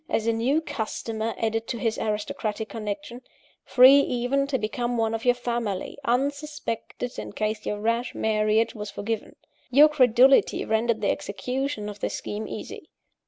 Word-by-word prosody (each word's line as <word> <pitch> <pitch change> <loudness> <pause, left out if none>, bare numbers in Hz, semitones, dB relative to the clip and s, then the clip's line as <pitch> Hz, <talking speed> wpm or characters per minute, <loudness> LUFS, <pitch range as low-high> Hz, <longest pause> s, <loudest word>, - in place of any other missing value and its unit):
as 225 - 0
a 230 - +2
new 250 +7 +1
customer 225 -5 -4
added 225 0 -1
to 235 - -3
his 225 -2 -1
aristocratic 215 0 -3
connection 235 +4 -5 0.4
free 265 +2 +7
even 270 +1 0
to 275 -2 0
become 240 +2 -2
one 225 -1 +1
of 225 +1 -4
your 245 0 +4
family, 235 -5 -3
unsuspected, 275 -2 -2
in - - -6
case 215 +1 -3
your 205 - -2
rash 230 +3 -1
marriage 215 +1 +1
was 210 -2 -6
forgiven. 210 +2 -4 0.3
Your 290 +4 +7
credulity 260 -2 +4
rendered 220 0 +1
the 200 - +2
execution 250 +3 -3
of 205 -1 -7
this - - -2
scheme 210 +1 -5
easy. - - -8
230 Hz, 155 wpm, -25 LUFS, 215-255 Hz, 0.4 s, free